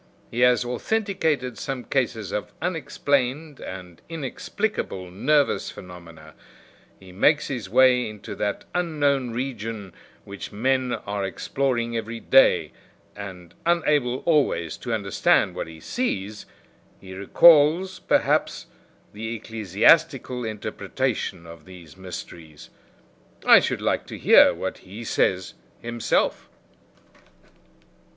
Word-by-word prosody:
He 120 Hz, -, -4 dB
has 125 Hz, 0 st, +4 dB
authenticated 155 Hz, -, -1 dB
some 135 Hz, -2 st, -4 dB
cases 115 Hz, -7 st, -2 dB
of 105 Hz, -, -4 dB
unexplained 145 Hz, -3 st, -1 dB
and 90 Hz, -2 st, -9 dB
inexplicable 155 Hz, -, -4 dB
nervous 145 Hz, +9 st, +1 dB
phenomena; 85 Hz, -4 st, -12 dB, 0.7 s
he 95 Hz, -1 st, -14 dB
makes 145 Hz, +11 st, +2 dB
his 120 Hz, -8 st, -4 dB
way 125 Hz, 0 st, +4 dB
into 105 Hz, -1 st, -9 dB
that 105 Hz, -1 st, -2 dB
unknown 145 Hz, -7 st, 0 dB
region 115 Hz, -5 st, -5 dB, 0.3 s
which 100 Hz, 0 st, -8 dB
men 130 Hz, +3 st, 0 dB
are 100 Hz, 0 st, -3 dB
exploring 120 Hz, +4 st, -2 dB
every 115 Hz, 0 st, -4 dB
day, 135 Hz, +3 st, +4 dB, 0.4 s
and 90 Hz, -4 st, -9 dB
unable 150 Hz, -7 st, +1 dB
always 140 Hz, -, +1 dB
to 120 Hz, -, -6 dB
understand 100 Hz, -4 st, +2 dB
what -, -, -5 dB
he 80 Hz, -1 st, -11 dB
sees, 105 Hz, -, -3 dB, 0.5 s
he 95 Hz, -1 st, -11 dB
recalls, 160 Hz, -, +5 dB
perhaps, -, -, +1 dB, 0.5 s
the 110 Hz, +2 st, -5 dB
ecclesiastical 115 Hz, -, +2 dB
interpretation 105 Hz, -5 st, -3 dB
of 85 Hz, -2 st, -12 dB
these 90 Hz, -5 st, -13 dB
mysteries. 85 Hz, -4 st, -10 dB, 0.7 s
I -, -, +9 dB
should -, -, -2 dB
like -, -, 0 dB
to -, -, -7 dB
hear -, -, +7 dB
what 95 Hz, -, -5 dB
he 100 Hz, +5 st, -10 dB
says 95 Hz, -4 st, 0 dB, 0.3 s
himself." 120 Hz, -1 st, -1 dB
115 Hz, 110 wpm, -24 LUFS, 95-140 Hz, 0.7 s, I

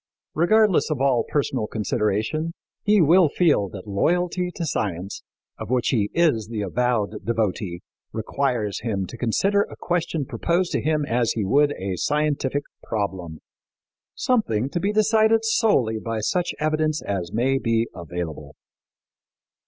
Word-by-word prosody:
Regardless 210 Hz, +3 st, +3 dB
of 155 Hz, -4 st, -1 dB
all 130 Hz, -3 st, +3 dB
personal 135 Hz, -6 st, 0 dB
consideration, 110 Hz, -, -1 dB, 0.3 s
he 210 Hz, -1 st, +4 dB
will 165 Hz, +2 st, +5 dB
feel 145 Hz, -, +2 dB
that 95 Hz, -1 st, -9 dB
loyalty 175 Hz, -, 0 dB
to 170 Hz, -, -3 dB
science, 100 Hz, -, -3 dB, 0.4 s
of -, -, -6 dB
which 125 Hz, -1 st, +1 dB
he 105 Hz, -5 st, +1 dB
is 150 Hz, -11 st, +2 dB
the 110 Hz, -2 st, -4 dB
avowed 110 Hz, 0 st, -1 dB
devotee, 105 Hz, -6 st, -1 dB, 0.3 s
requires 115 Hz, -2 st, -1 dB
him 105 Hz, -4 st, -2 dB
to 90 Hz, -, -9 dB
consider 195 Hz, -, +1 dB
a -, -, -4 dB
question 165 Hz, -4 st, -1 dB
proposed 170 Hz, +8 st, 0 dB
to -, -, 0 dB
him 155 Hz, -1 st, +1 dB
as 120 Hz, -3 st, +1 dB
he 110 Hz, -3 st, -1 dB
would 145 Hz, +8 st, +3 dB
a 95 Hz, -1 st, -3 dB
scientific 145 Hz, -, 0 dB, 0.2 s
problem 95 Hz, -6 st, -4 dB, 0.7 s
something 140 Hz, -, 0 dB
to 175 Hz, -, -1 dB
be 200 Hz, +4 st, 0 dB
decided 220 Hz, +1 st, +3 dB
solely 140 Hz, -, +2 dB
by 115 Hz, 0 st, -3 dB
such 175 Hz, -, -1 dB
evidence 155 Hz, 0 st, 0 dB
as 95 Hz, -4 st, -3 dB
may 130 Hz, +4 st, +1 dB
be 115 Hz, -2 st, +1 dB
available. 85 Hz, -4 st, -6 dB
125 Hz, 140 wpm, -23 LUFS, 105-165 Hz, 0.7 s, will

